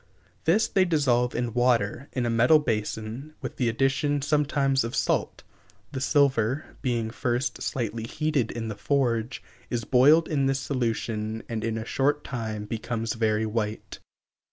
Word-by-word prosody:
This 200 +8 +3
they 190 - +3
dissolve 130 -8 +2
in 120 -1 -2
water, 120 0 +1
in 125 -2 -1
a - - 0
metal 120 +7 +5
basin, 115 +2 -3
with - - -6
the 120 -3 +1
addition, 135 +4 +1
sometimes, 140 -2 +2
of 115 +1 -4
salt. - - 0 0.5
The 130 - -4
silver, 140 -2 +1
being 120 -4 -1
first 120 +3 -2
slightly 115 -2 -3
heated 150 -4 0
in 115 -1 -4
the 110 - -3
forge, 125 -3 0 0.3
is 120 -2 -2
boiled 150 +6 +5
in 140 -3 +1
this 135 0 +1
solution 115 -4 -2
and 115 -2 -4
in 115 -1 -1
a 110 - -4
short 145 +4 0
time 110 -5 -4
becomes 115 +1 -3
very 110 -1 +1
white. 110 -1 -3
120 Hz, 155 wpm, -26 LUFS, 115-140 Hz, 0.5 s, metal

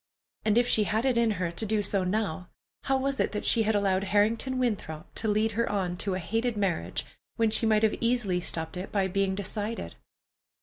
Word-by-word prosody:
And 215 0 +3
if 240 0 +4
she 215 -3 +3
had 220 +5 0
it 260 -2 +2
in 235 -1 +3
her 175 -2 -1
to 170 +6 -2
do 215 -1 0
so 195 -1 +1
now, 185 -2 -2 0.4
how 270 -1 +2
was 270 0 -1
it - - +1
that 210 - -3
she 230 - +4
had 220 0 +1
allowed 195 -1 +1
Harrington 220 +6 +1
Winthrop 200 -10 -3
to 225 - -4
lead 215 +1 +2
her 230 +2 0
on 185 -4 -1
to 190 +1 -1
a - - -2
hated 225 +6 -1
marriage, 180 - -1 0.3
when 225 -1 +2
she 225 +1 +2
might 215 0 +3
have 220 - +4
easily 230 -7 +1
stopped 160 0 -3
it 185 - -6
by 195 -2 +1
being 195 0 0
decided? 210 +3 -3
210 Hz, 215 wpm, -28 LUFS, 190-225 Hz, 0.4 s, if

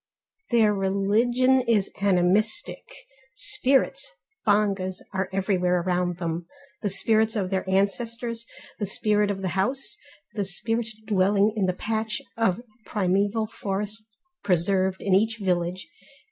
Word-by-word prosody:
Their 225 -3 +4
religion 220 +7 +2
is 210 -4 +2
animistic, 200 - +1 0.5
spirits 390 - +1 0.4
(bongas) 200 -3 +1
are 190 0 -1
everywhere 185 -2 +1
around 175 -1 0
them: 170 -1 -3 0.3
the 205 - 0
spirits 220 +3 +2
of 195 -3 -1
their 190 0 -1
ancestors, 230 +4 -1 0.3
the 205 - -1
spirit 210 +1 +1
of 195 -1 -3
the 185 - 0
house, 240 +10 -2 0.4
the 205 - -1
spirit 225 +5 -2 0.2
dwelling 205 0 +3
in 200 -3 +1
the 185 - +1
patch 220 +4 -2 0.2
of 225 -1 +1 0.2
primeval 200 +2 +1
forest 210 0 -4 0.3
preserved 190 0 +1
in 195 - +1
each 220 +4 +3
village. 180 -2 -1
200 Hz, 120 wpm, -25 LUFS, 190-220 Hz, 0.5 s, Their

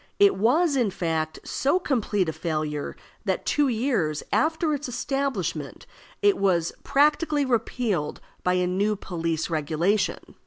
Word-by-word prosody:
It 405 -1 +5
was, 290 - +3
in 240 -6 +2
fact, 160 -4 -2
so 280 +6 +1
complete 215 - 0
a 160 - -2
failure, 155 -3 -3 0.3
that - - -1
two 295 -1 +2
years 225 - 0
after 320 0 +2
its 285 -2 -3
establishment 235 - -2 0.4
it 405 -1 +4
was 175 -4 +2
practically 295 +1 +2
repealed 225 - -1 0.2
by 180 - +2
a 180 0 +2
new 200 +4 +1
police 165 -4 -2
regulation. 165 +6 0
205 Hz, 130 wpm, -25 LUFS, 165-280 Hz, 0.4 s, It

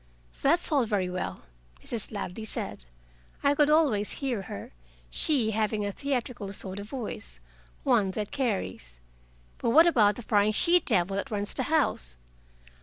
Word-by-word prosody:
"That's 335 +5 +3
all 280 -4 +4
very 195 -5 -1
well," 185 - -4 0.4
Mrs. 230 -4 -4
Ladley 205 0 -5
said. 210 - -3 0.6
I 280 - +4
could 295 0 +3
always 280 -10 +3
hear 255 -7 -2
her, 105 - -8 0.4
she 250 - +1
having 215 -1 0
a 200 - -2
theatrical 245 -5 -3
sort 190 0 -4
of 205 +1 -8
voice 205 - -6 0.4
one 195 -2 +3
that 210 -1 -3
carries. 190 - -3 0.6
"But - - 0
what 320 +8 +7
about 220 -11 +4
the 245 - -8
prying 210 0 +2
she 345 +10 +5
devil 195 - +2
that 200 - -3
runs 205 -2 -1
the - - -2
house?" 65 - +2
215 Hz, 155 wpm, -28 LUFS, 200-275 Hz, 0.6 s, what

